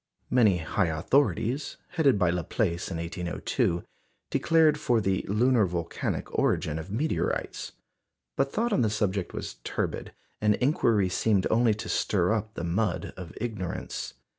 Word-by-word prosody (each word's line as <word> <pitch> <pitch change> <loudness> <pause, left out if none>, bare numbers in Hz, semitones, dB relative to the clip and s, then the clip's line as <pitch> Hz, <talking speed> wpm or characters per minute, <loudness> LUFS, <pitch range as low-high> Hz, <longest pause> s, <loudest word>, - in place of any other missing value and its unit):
Many 110 -7 +5
high 85 +3 0
authorities, 115 - +1
headed 155 - +3
by 90 -3 +3
Laplace 90 0 -1
in 85 - -4
1802, 85 0 -1 0.5
declared 160 -2 +4
for 120 -6 +2
the 95 -3 0
lunar 115 +1 +3
volcanic 85 -1 -3
origin 80 0 +1
of 80 +4 -8
meteorites; 130 +11 -2 0.6
but 135 - +1
thought 230 +5 0
on - - +3
the 110 - +3
subject 100 -3 -1
was - - -6
turbid, - - -3 0.3
and 105 -1 +4
inquiry 115 - +2
seemed 100 +1 +1
only 115 -1 +4
to 110 - -6
stir 95 0 +1
up 110 0 -3
the 85 - -4
mud 90 +2 -1
of 90 -2 -8
ignorance. 105 -7 -4
105 Hz, 140 wpm, -28 LUFS, 90-120 Hz, 0.6 s, Many